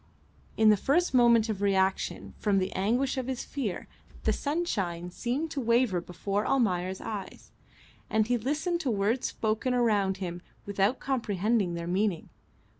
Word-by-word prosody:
In 220 Hz, -1 st, +6 dB
the 210 Hz, -, +6 dB
first 305 Hz, -, +1 dB
moment 235 Hz, -3 st, +5 dB
of 210 Hz, -3 st, -3 dB
reaction 190 Hz, -1 st, 0 dB
from 205 Hz, -2 st, +2 dB
the 190 Hz, 0 st, 0 dB
anguish 245 Hz, +8 st, 0 dB
of 255 Hz, -, -4 dB
his 260 Hz, -2 st, -3 dB
fear 240 Hz, -10 st, -4 dB, 0.4 s
the -, -, +2 dB
sunshine 195 Hz, -, -2 dB
seemed 265 Hz, -, -2 dB
to 275 Hz, -, -2 dB
waver 230 Hz, -6 st, +2 dB
before 195 Hz, +4 st, -2 dB
Almayer's 190 Hz, -9 st, 0 dB
eyes, 210 Hz, -3 st, -7 dB, 0.6 s
and 215 Hz, 0 st, +2 dB
he 245 Hz, +2 st, +1 dB
listened 300 Hz, -, -1 dB
to 280 Hz, -, -1 dB
words 220 Hz, +3 st, +1 dB
spoken 220 Hz, +4 st, -1 dB
around 205 Hz, -6 st, +2 dB
him 175 Hz, -2 st, -5 dB, 0.2 s
without 200 Hz, +5 st, +1 dB
comprehending 215 Hz, -6 st, 0 dB
their 170 Hz, 0 st, -4 dB
meaning. 185 Hz, 0 st, -1 dB
215 Hz, 150 wpm, -29 LUFS, 190-250 Hz, 0.6 s, In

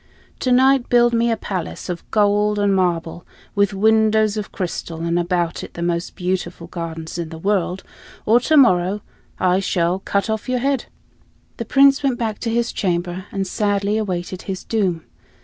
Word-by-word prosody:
To 255 Hz, -, 0 dB
night 260 Hz, 0 st, +4 dB
build 240 Hz, -1 st, +4 dB
me 235 Hz, 0 st, +2 dB
a 225 Hz, -, +1 dB
palace 185 Hz, -4 st, -5 dB
of 175 Hz, -2 st, -6 dB
gold 210 Hz, 0 st, +2 dB
and 200 Hz, -1 st, +2 dB
marble, 170 Hz, -2 st, -1 dB, 0.3 s
with 200 Hz, 0 st, +2 dB
windows 220 Hz, +1 st, +3 dB
of 210 Hz, -2 st, -4 dB
crystal, 170 Hz, -3 st, -4 dB
and 170 Hz, +1 st, +1 dB
about 175 Hz, -1 st, -1 dB
it -, -, -10 dB
the 170 Hz, -, -4 dB
most 170 Hz, 0 st, -2 dB
beautiful 180 Hz, -2 st, -3 dB
gardens 165 Hz, -1 st, -6 dB
in 165 Hz, -2 st, -4 dB
the 160 Hz, -, -8 dB
world, 190 Hz, 0 st, -1 dB, 0.4 s
or 230 Hz, +3 st, +5 dB
tomorrow 210 Hz, -, +3 dB, 0.4 s
I 185 Hz, 0 st, +3 dB
shall 180 Hz, -1 st, 0 dB
cut 200 Hz, +1 st, -1 dB
off 220 Hz, +2 st, -3 dB
your 255 Hz, -, +1 dB
head." 270 Hz, 0 st, 0 dB, 0.7 s
The -, -, -4 dB
Prince 275 Hz, 0 st, +5 dB
went 270 Hz, -4 st, 0 dB
back 220 Hz, -3 st, -3 dB
to 230 Hz, -, -2 dB
his 235 Hz, +1 st, 0 dB
chamber 175 Hz, 0 st, -2 dB
and 195 Hz, -1 st, -2 dB
sadly 205 Hz, +1 st, 0 dB
awaited 185 Hz, -3 st, -3 dB
his 190 Hz, -1 st, -5 dB
doom. 185 Hz, -7 st, -1 dB
195 Hz, 170 wpm, -20 LUFS, 175-220 Hz, 0.7 s, or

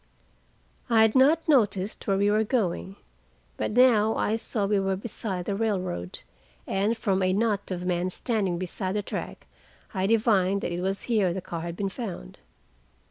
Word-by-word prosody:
I 225 Hz, -2 st, +5 dB
had 220 Hz, -1 st, +3 dB
not 295 Hz, +5 st, +4 dB
noticed 210 Hz, -9 st, +1 dB
where 195 Hz, -1 st, +2 dB
we 200 Hz, +1 st, +3 dB
were 215 Hz, +1 st, +3 dB
going, 175 Hz, -, -1 dB, 0.6 s
but -, -, -2 dB
now 225 Hz, -2 st, +4 dB
I 215 Hz, -, 0 dB
saw 220 Hz, -2 st, -2 dB
we 200 Hz, 0 st, +2 dB
were 195 Hz, 0 st, 0 dB
beside 195 Hz, -3 st, -5 dB
the 200 Hz, -, -1 dB
railroad, 185 Hz, -, -2 dB, 0.4 s
and 205 Hz, +4 st, 0 dB
from 195 Hz, -3 st, 0 dB
a 185 Hz, 0 st, +2 dB
knot 205 Hz, -1 st, 0 dB
of 180 Hz, -1 st, -4 dB
men 180 Hz, 0 st, 0 dB
standing 195 Hz, -3 st, -1 dB
beside 185 Hz, +2 st, -4 dB
the 210 Hz, -, -1 dB
track -, -, -6 dB, 0.5 s
I 190 Hz, -1 st, 0 dB
divined 200 Hz, -3 st, +2 dB
that -, -, -3 dB
it 175 Hz, +1 st, -3 dB
was 195 Hz, +1 st, -2 dB
here 210 Hz, -7 st, +1 dB
the -, -, -2 dB
car 170 Hz, -2 st, -6 dB
had 170 Hz, 0 st, -5 dB
been 195 Hz, -1 st, -1 dB
found. 190 Hz, -, -7 dB
200 Hz, 175 wpm, -26 LUFS, 185-220 Hz, 0.6 s, I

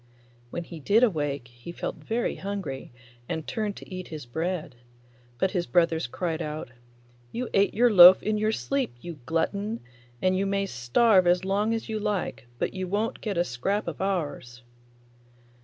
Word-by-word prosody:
When 170 Hz, -, -4 dB
he 170 Hz, -1 st, -9 dB
did 205 Hz, -, +3 dB
awake 145 Hz, -, 0 dB
he 120 Hz, +7 st, -10 dB
felt -, -, -4 dB
very 230 Hz, +2 st, -2 dB
hungry 195 Hz, -11 st, -5 dB, 0.4 s
and 160 Hz, -1 st, -3 dB
turned 215 Hz, -3 st, -2 dB
to -, -, -11 dB
eat 185 Hz, 0 st, -6 dB
his 155 Hz, -5 st, -7 dB
bread, 160 Hz, +6 st, -3 dB, 0.6 s
but 190 Hz, -, +1 dB
his 175 Hz, -3 st, -1 dB
brothers 165 Hz, -4 st, +2 dB
cried 165 Hz, +4 st, -3 dB
out, 150 Hz, -5 st, -5 dB, 0.6 s
'You 245 Hz, 0 st, -3 dB
ate 200 Hz, +1 st, +3 dB
your 240 Hz, +2 st, +5 dB
loaf 180 Hz, 0 st, +10 dB
in 215 Hz, 0 st, 0 dB
your 215 Hz, +1 st, +2 dB
sleep, 270 Hz, -, -2 dB
you 170 Hz, +1 st, -8 dB
glutton, 200 Hz, +7 st, -1 dB, 0.4 s
and 185 Hz, 0 st, +2 dB
you 195 Hz, +1 st, 0 dB
may 195 Hz, 0 st, 0 dB
starve 185 Hz, -, +3 dB
as 180 Hz, +1 st, +3 dB
long 205 Hz, +3 st, +1 dB
as 225 Hz, -, -4 dB
you 220 Hz, -1 st, -2 dB
like, 195 Hz, -, -2 dB
but -, -, -1 dB
you 185 Hz, -1 st, -3 dB
won't 210 Hz, +4 st, -1 dB
get 205 Hz, -5 st, -3 dB
a 175 Hz, -, +4 dB
scrap 180 Hz, -, -2 dB
of 170 Hz, 0 st, -4 dB
ours. 145 Hz, -10 st, -3 dB
185 Hz, 175 wpm, -27 LUFS, 160-205 Hz, 0.6 s, loaf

